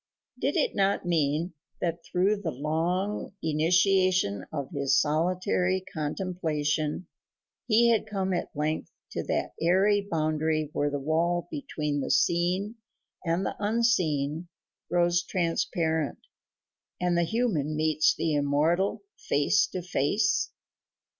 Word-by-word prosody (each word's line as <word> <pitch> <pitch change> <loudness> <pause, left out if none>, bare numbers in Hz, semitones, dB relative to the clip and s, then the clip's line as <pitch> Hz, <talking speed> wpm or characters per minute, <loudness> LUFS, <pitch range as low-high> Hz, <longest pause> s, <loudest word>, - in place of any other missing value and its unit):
Did - - 0
it - - +1
not 195 -1 +1
mean 165 0 0 0.3
that 170 -1 -2
through 200 +3 +1
the 175 - -2
long 170 +9 -2
initiation 175 - +2
of 140 -4 -4
his 140 -3 +2
solitary 180 +4 +1
contemplation 155 -1 -2 0.6
he 235 +1 +5
had 225 - +1
come 190 -2 -1
at 175 - -2
length 155 +2 -2 0.2
to - - -2
that - - -1
aery 195 +4 +3
boundary 155 -2 0
where 145 - +1
the 145 - -2
wall 165 +4 0
between 145 0 -3
the - - -3
seen 185 +6 +1 0.5
and 175 +2 0
the - - -2
unseen 175 -9 +1 0.4
grows 175 0 +3
transparent 165 -3 -1 0.8
and 180 -1 +1
the 170 - +3
human 170 - 0
meets 155 0 +2
the 160 - -1
immortal 150 - +1
face 450 - +2
to 185 - -5
face? 185 +5 +1
170 Hz, 120 wpm, -27 LUFS, 155-185 Hz, 0.8 s, he